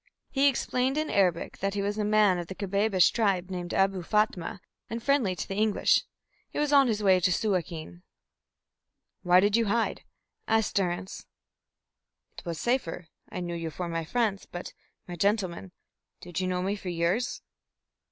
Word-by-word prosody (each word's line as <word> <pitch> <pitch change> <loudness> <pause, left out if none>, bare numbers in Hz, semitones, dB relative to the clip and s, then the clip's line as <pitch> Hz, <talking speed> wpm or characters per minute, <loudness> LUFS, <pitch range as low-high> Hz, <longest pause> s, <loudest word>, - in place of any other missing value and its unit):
He 275 +1 +3
explained 260 0 0
in 310 0 -1
Arabic 180 -4 +1
that 195 +1 -1
he 200 - -1
was 205 +1 -2
a - - +1
man 210 -3 +3
of 175 - -5
the 190 - -7
Kabbabish 200 -1 +2
tribe 190 -5 0
named 175 -1 -4
Abou 195 -1 +1
Fatma, 205 -1 0 0.3
and 230 0 -5
friendly 255 -10 +2
to - - -5
the - - -4
English. 215 +1 +2 0.4
He - - -8
was 295 0 +1
on 275 -2 +6
his 215 -2 -1
way 190 -2 +5
to 180 +1 +2
Suakin. 170 - -2 1.2
"Why 180 0 +5
did 205 +2 +3
you 230 0 +3
hide?" 225 +2 0 0.5
asked 220 -1 +1
Durrance. 185 0 -2 1.1
"It - - -10
was 165 -2 -4
safer. 180 -9 -1 0.2
I 180 - -5
knew 175 -1 -4
you 165 -1 -4
for 175 +3 -5
my 165 -1 -2
friends. 210 +2 -1
But, 175 - -7 0.3
my 175 - -6
gentleman, 195 -1 -1 0.5
did 175 0 -5
you 185 - -1
know 180 0 -1
me 195 +2 0
for 195 -3 -6
yours?" 175 +7 -1
195 Hz, 170 wpm, -28 LUFS, 175-215 Hz, 1.2 s, on